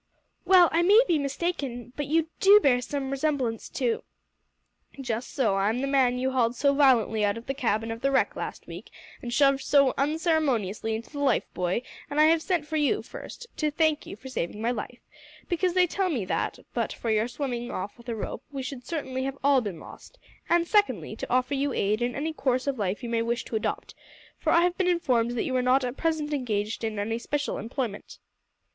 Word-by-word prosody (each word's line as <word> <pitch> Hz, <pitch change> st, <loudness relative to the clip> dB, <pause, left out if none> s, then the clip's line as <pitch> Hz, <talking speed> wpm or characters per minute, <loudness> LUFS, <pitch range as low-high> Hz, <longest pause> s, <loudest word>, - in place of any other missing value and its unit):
"Well 360 Hz, -1 st, +7 dB
I 335 Hz, -, +3 dB
may 400 Hz, +6 st, +6 dB
be 330 Hz, -3 st, +2 dB
mistaken, 275 Hz, -4 st, -3 dB
but 290 Hz, -2 st, -3 dB
you 320 Hz, +1 st, +1 dB
do 405 Hz, +2 st, +8 dB
bear 250 Hz, -9 st, +3 dB
some 275 Hz, +1 st, -4 dB
resemblance 275 Hz, -5 st, -1 dB
to 245 Hz, -3 st, -1 dB, 0.5 s
" -, -, -48 dB
"Just 240 Hz, -2 st, -3 dB
so, 220 Hz, -8 st, +1 dB
I'm 215 Hz, +5 st, +1 dB
the -, -, 0 dB
man 265 Hz, -3 st, +3 dB
that 250 Hz, -, -3 dB
you 265 Hz, -, +1 dB
hauled 245 Hz, -2 st, +1 dB
so 280 Hz, +3 st, +2 dB
violently 245 Hz, -6 st, +3 dB
out 205 Hz, +1 st, +1 dB
of 230 Hz, -, -9 dB
the 270 Hz, -, -2 dB
cabin 225 Hz, -4 st, -1 dB
of 225 Hz, 0 st, -6 dB
the 275 Hz, -, +2 dB
wreck 275 Hz, -, +1 dB
last -, -, -6 dB
week, -, -, -9 dB, 0.3 s
and 240 Hz, -, -5 dB
shoved 275 Hz, +1 st, +3 dB
so 280 Hz, -2 st, +4 dB
unceremoniously 275 Hz, -, 0 dB
into 225 Hz, +1 st, -7 dB
the 290 Hz, -, -6 dB
life 275 Hz, -4 st, +2 dB
buoy, 180 Hz, +6 st, -1 dB, 0.3 s
and 290 Hz, +1 st, -1 dB
I -, -, +7 dB
have 320 Hz, +1 st, +4 dB
sent 345 Hz, -4 st, -1 dB
for 315 Hz, +1 st, -2 dB
you, 305 Hz, +8 st, +1 dB
first, 480 Hz, -, -9 dB
to 305 Hz, -, +1 dB
thank 310 Hz, 0 st, +1 dB
you -, -, -7 dB
for 245 Hz, +6 st, -12 dB
saving 210 Hz, -5 st, -4 dB
my 230 Hz, +2 st, 0 dB
life, 245 Hz, +1 st, -6 dB, 0.5 s
because 355 Hz, 0 st, 0 dB
they 365 Hz, -1 st, +5 dB
tell 375 Hz, +2 st, -1 dB
me 245 Hz, -, -1 dB
that, -, -, -2 dB, 0.2 s
but -, -, -1 dB
for 230 Hz, -, -3 dB
your 215 Hz, +1 st, +2 dB
swimming 245 Hz, -1 st, -4 dB
off 195 Hz, +2 st, -5 dB
with 240 Hz, 0 st, -12 dB
a 230 Hz, -, -2 dB
rope, 220 Hz, -, -5 dB
we 275 Hz, -2 st, -4 dB
should 255 Hz, -1 st, -7 dB
certainly 265 Hz, -5 st, -3 dB
have 270 Hz, 0 st, -4 dB
all 280 Hz, -2 st, +5 dB
been 200 Hz, -8 st, -5 dB
lost; -, -, -13 dB, 0.3 s
and, 340 Hz, 0 st, +3 dB
secondly, 415 Hz, +1 st, +1 dB
to -, -, -6 dB
offer 255 Hz, +2 st, +1 dB
you 280 Hz, -1 st, 0 dB
aid 210 Hz, +3 st, 0 dB
in 245 Hz, +1 st, -1 dB
any 315 Hz, +3 st, -2 dB
course 255 Hz, -4 st, 0 dB
of 275 Hz, -4 st, -2 dB
life 200 Hz, +4 st, -2 dB
you 240 Hz, -, -4 dB
may 230 Hz, -1 st, +1 dB
wish 235 Hz, +1 st, -2 dB
to -, -, -5 dB
adopt, 215 Hz, -, -3 dB, 0.5 s
for -, -, 0 dB
I 335 Hz, -, +5 dB
have 355 Hz, 0 st, +2 dB
been 375 Hz, -, +2 dB
informed 245 Hz, -9 st, +1 dB
that -, -, +1 dB
you 260 Hz, -, -2 dB
are -, -, +2 dB
not 255 Hz, +2 st, +3 dB
at 250 Hz, 0 st, -3 dB
present 315 Hz, -2 st, -1 dB
engaged 220 Hz, -6 st, -2 dB
in 220 Hz, -1 st, -2 dB
any 225 Hz, +3 st, -2 dB
special 290 Hz, +4 st, -2 dB
employment." 230 Hz, -2 st, -5 dB
265 Hz, 220 wpm, -27 LUFS, 230-300 Hz, 0.5 s, do